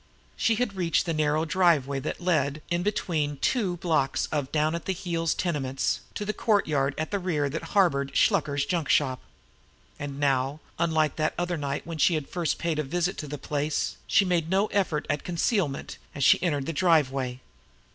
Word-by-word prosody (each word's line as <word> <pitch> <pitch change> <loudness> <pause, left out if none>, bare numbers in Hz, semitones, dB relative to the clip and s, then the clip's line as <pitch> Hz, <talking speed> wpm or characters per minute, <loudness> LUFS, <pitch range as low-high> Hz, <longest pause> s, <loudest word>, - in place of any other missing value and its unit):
She 225 - +2
had 220 -3 -1
reached 175 -3 +1
the 165 - -1
narrow 155 +1 +1
driveway 155 -6 +2
that 145 - -4
led 155 -4 0
in, 175 0 +1
between 165 -7 -1
the - - -8
two 185 - 0
blocks 160 -6 +1
of 145 -3 -2
down 155 0 +1
at 170 - -4
the 190 - 0
heels 165 -2 -1
tenements, 135 -6 -1 0.2
to 205 - -3
the 215 - -1
courtyard 150 - +1
at 155 - -3
the 200 - 0
rear 160 -6 0
that 165 - -3 0.2
harbored 140 -8 +2
Shluker's 145 -8 +2
junk 165 -4 -1
shop. 130 -1 +2 0.8
And 140 -1 -5
now, 135 0 +1 0.2
unlike 160 -3 +1
that 155 -1 0
other 175 0 -1
night 140 -3 -3
when 165 -1 -6
she 170 - +4
had 150 -3 -3
first 175 -3 -1
paid 165 -2 -1
a - - +1
visit 175 +6 -1
to 150 - -5
the 145 +1 -5
place, 145 +2 -2
she 200 - +4
made 170 -3 0
no 195 +3 +3
effort 185 -7 0
at 145 - -1
concealment 175 - -1 0.2
as 140 - -2
she - - +6
entered 145 -6 0
the 165 - -3
driveway. 135 -7 +2
155 Hz, 190 wpm, -27 LUFS, 145-175 Hz, 0.8 s, she